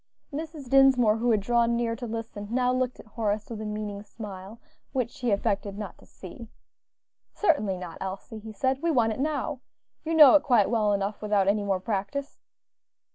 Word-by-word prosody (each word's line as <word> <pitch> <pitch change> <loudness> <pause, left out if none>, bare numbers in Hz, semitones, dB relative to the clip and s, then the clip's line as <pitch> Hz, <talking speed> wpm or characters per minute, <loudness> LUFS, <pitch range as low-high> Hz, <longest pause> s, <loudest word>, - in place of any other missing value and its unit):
Mrs. 305 -2 -6
Dinsmore, 250 -4 +5
who 240 +2 0
had 215 -3 +3
drawn 235 +2 +2
near 235 -1 -1
to 240 +1 -6
listen, 225 -2 -6
now 250 +1 +1
looked 255 0 -1
at - - -12
Horace 215 -1 -3
with 220 -2 -5
a 215 - -4
meaning 210 -1 -4
smile, 205 0 -9 0.3
which 255 +1 -2
he 245 -2 -1
affected 200 -1 -1
not 210 -3 -7
to - - -19
see. 210 +5 -11 0.9
"Certainly 215 - +1
not, 180 -2 -8
Elsie," 195 +3 -6
he 220 +1 -9
said; 260 +5 -1
"we 335 - 0
want 235 -7 +2
it - - -8
now. 295 -1 -2 0.4
You 330 0 -1
know 300 -5 +9
it 300 - +6
quite 235 -7 +3
well 215 -3 +2
enough 200 +1 -2
without 205 -2 +1
any 205 +1 +2
more 195 -2 0
practice." 205 +8 -4
225 Hz, 185 wpm, -27 LUFS, 205-255 Hz, 0.9 s, know